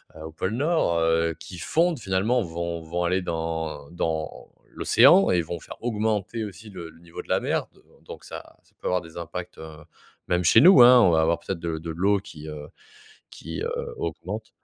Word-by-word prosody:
heu, 80 - -11
au 80 - -8
pôle 95 +6 -3
Nord, 145 - +1
heu, 80 0 +1
qui 90 -2 -10
fondent, 165 - +1
finalement, 105 +5 0
vont 85 -2 -4
vont 85 +2 -3
aller 90 +2 +1
dans 80 -4 -4
dans 80 -2 -4 0.2
l'océan 155 +11 +5
et 90 -2 +3
vont 85 +1 -6
faire - - -11
augmenter 110 -1 -1
aussi 105 +1 -9
le 85 -4 -8
le 80 0 -18
niveau 85 -1 -9
de - - -23
la - - +2
mer. - - -1
D - - -28
heu, - - -23 0.2
donc - - -11
ça - - -10
ça - - -31
peut - - -5
avoir 90 0 +1
des 80 0 -13
impacts, 85 +1 -7
heu, 80 -1 -10 0.5
même 90 0 +1
chez 110 +7 +6
nous, 170 -5 +8
hein, 125 0 +8
on 95 - +5
va 80 -1 +3
avoir 80 +1 +2
peut-être 95 -3 -5
de 85 -1 -3
de 80 +1 -7
l'eau 100 +5 +1
qui, 80 -5 -11
heu, 75 -1 -8 0.6
qui, - - -8
heu, 475 0 -4
augmente. 425 - -5
85 Hz, 210 wpm, -25 LUFS, 80-110 Hz, 0.6 s, nous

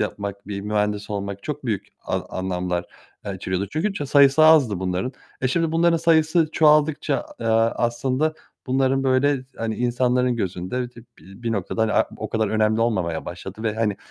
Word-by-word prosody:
yapmak, 100 -1 -4
bir 100 -1 -4
mühendis 105 0 -1
olmak 100 -1 -4
çok 150 -2 -5
büyük 105 -6 -2
a - - -2 0.2
anlamlar, 90 -1 -2 0.4
aaa, 100 - -4
içeriyordu. 95 +1 -3
Çünkü 180 +7 0
ça 150 -7 -4
sayısı 140 +2 +5
azdı 135 - +5
bunların. 95 +7 -2 0.3
E, 130 - +1
şimdi 165 +3 0
bunların 170 +1 +3
sayısı 160 0 +3
çoğaldıkça, 150 -1 +3 0.2
a 115 - -7
eee, - - -1 0.3
aslında 130 +6 0 0.3
bunların, 135 +1 +1
böyle, 130 0 +2
hani, 115 -1 -2
insanların 125 0 +1
gözünde, 100 +5 -3
dı - - -33 0.2
bi 95 +5 -15
bir 115 -1 -1
noktada, 105 +2 -1
hani, 110 - +1
a - - +4
o - - -5
kadar 110 -1 0
önemli 110 +1 +1
olmamaya 95 -9 0
başladı. 95 +4 -8
Ve, 110 -2 -1
hani, 110 -3 0
115 Hz, 175 wpm, -23 LUFS, 100-140 Hz, 0.4 s, sayısı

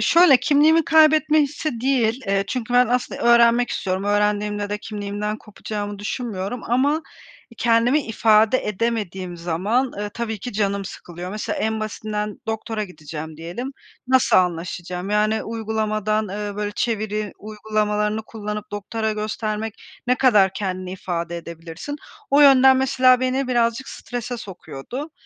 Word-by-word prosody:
şöyle, 335 -5 +6
kimliğimi 300 +5 +4
kaybetme 310 -1 +5
hissi 285 -4 -3
değil, 250 -2 +1
eee, 195 0 +1
çünkü 245 -1 -3
ben 250 0 +6
aslında 250 +1 -1
öğrenmek 235 0 +5
istiyorum. 190 0 -2
Öğrendiğimde 205 0 0
de 210 - -2
kimliğimden 210 0 -4
kopacağımı 205 -1 -6
düşünmüyorum 210 0 -4
ama, 285 +6 +1 0.5
e, - - -15
kendimi 240 +5 +3
ifade 220 +2 +4
edemediğim 195 -5 -2
zaman, 195 +10 0
eee, 205 0 -3
tabii 225 -2 -3
ki 245 +5 -6
canım 200 -1 -1
sıkılıyor. 175 0 -8
Mesela 210 +1 -3
en 220 0 -1
basitinden 210 -1 -4
doktora 220 -1 -3
gideceğim 155 -2 -8
diyelim. 195 - -6 0.4
Nasıl 260 0 +4
anlaşacağım, 180 +1 -1
yani, 215 +1 +2
uygulamadan, 215 -1 -1
eee, 205 +1 -5
böyle, 210 0 -2
çeviri 215 -2 -2
uygulamalarını 210 0 -1
kullanıp 210 -1 -6
doktora 220 +2 -2
göstermek 215 0 -3 0.3
ne 250 - +4
kadar 210 -8 +4
kendini 185 -2 -4
ifade 170 -2 -4
edebilirsin? 170 - -7 0.3
O 285 +1 +5
yönden 265 -2 +7
mesela 255 -1 +4
beni 255 +1 0
birazcık 235 0 +1
strese 245 0 -5
sokuyordu. 205 - -8
215 Hz, 135 wpm, -22 LUFS, 200-245 Hz, 0.5 s, yönden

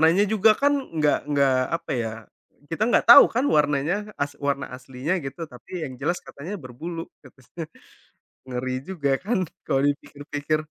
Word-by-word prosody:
Warnanya 165 +5 +5
juga 220 +1 +5
kan 285 +1 +4 0.2
nggak 150 -1 +3
nggak 140 -2 +3 0.2
apa - - -12
ya, 115 - -2 0.6
kita 165 +6 -2
nggak - - +3
tahu 280 +4 +12
kan 250 +4 +2
warnanya 145 +3 +2 0.3
as 145 0 -2
warna 140 0 0
aslinya 130 +5 -4
gitu, 135 +4 -7
tapi 120 -1 -15
yang 130 - -6
jelas 175 - 0
katanya 155 +8 -8
berbulu, 160 +7 -6 0.2
katanya. 135 +5 -10 0.8
Ngeri 130 0 -3 0.2
juga 150 -7 -1
kan 220 +1 0 0.3
kalau 135 - +1
dipikir-pikir? 145 +1 -2
145 Hz, 150 wpm, -24 LUFS, 135-170 Hz, 0.8 s, tahu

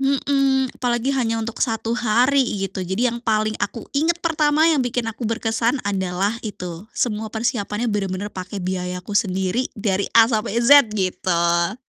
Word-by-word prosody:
Mhm, 270 -1 +1
apalagi 240 +1 0
hanya 230 -3 0
untuk 230 +1 -6
1 225 -1 -1
hari 250 +4 +3 0.2
gitu, 190 -1 -4
jadi 225 +7 +1
yang 235 - -4
paling 215 -1 +1
aku 230 - -3
ingat 325 +4 +2
pertama, 305 -2 +2
yang 310 - +2
bikin 245 0 -1
aku 225 +1 -5
berkesan 230 +3 0
adalah 190 +1 -1
itu 180 -2 -7
semua 220 -2 -1
persiapannya 220 -1 -2
bener-bener 200 -1 -2
pakai 185 +2 -6
biayaku 180 +1 -4
sendiri, 190 +4 -1
dari 200 -1 0
A 225 -1 +8
sampai 220 0 0
Z, 285 +2 +7
gitu. 170 0 0
225 Hz, 150 wpm, -21 LUFS, 190-250 Hz, 0.2 s, A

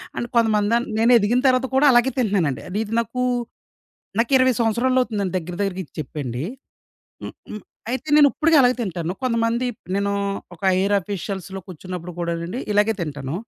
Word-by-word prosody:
అంటే 240 - -3
కొంతమంది 220 -1 +3 0.2
నేను 230 +2 +4
ఎదిగిన 230 +3 +2
తర్వాత 255 0 +3
కూడా 275 +2 +5
అలాగే 240 +1 +4
తింటున్నానండి. 185 - 0
అది 195 +4 -2
ఇది 220 0 -7
నాకు 235 +2 -3 1.0
నాకు 230 +4 +1
20 260 0 +4
సంవత్సరాలవుతుందండి 230 -4 +1
దగ్గర 175 0 -7
దగ్గరగా 195 -2 -1
ఇది - - -26
చెప్పండి. 140 -4 -5 0.8
హ్మ్. - - -6 0.2
హ్మ్. 215 - -6 0.3
అయితే 260 +4 -4
నేను 295 -1 +7
ఇప్పడుకి 325 0 +3
అలాగే 250 -1 +4
తింటాను. 175 -4 -3
కొంతమంది 230 0 0 0.3
నేను 200 0 0 0.4
ఒక 165 - -21
హైయర్ 190 +2 +2
ఆఫీషియల్స్‌లో 195 0 -5
కూర్చున్నప్పుడు 180 -1 -7
కూడానండి, 170 +5 -3
ఇలాగే 210 +2 +3
తింటాను. 145 -3 -4
205 Hz, 150 wpm, -22 LUFS, 180-240 Hz, 1.0 s, నేను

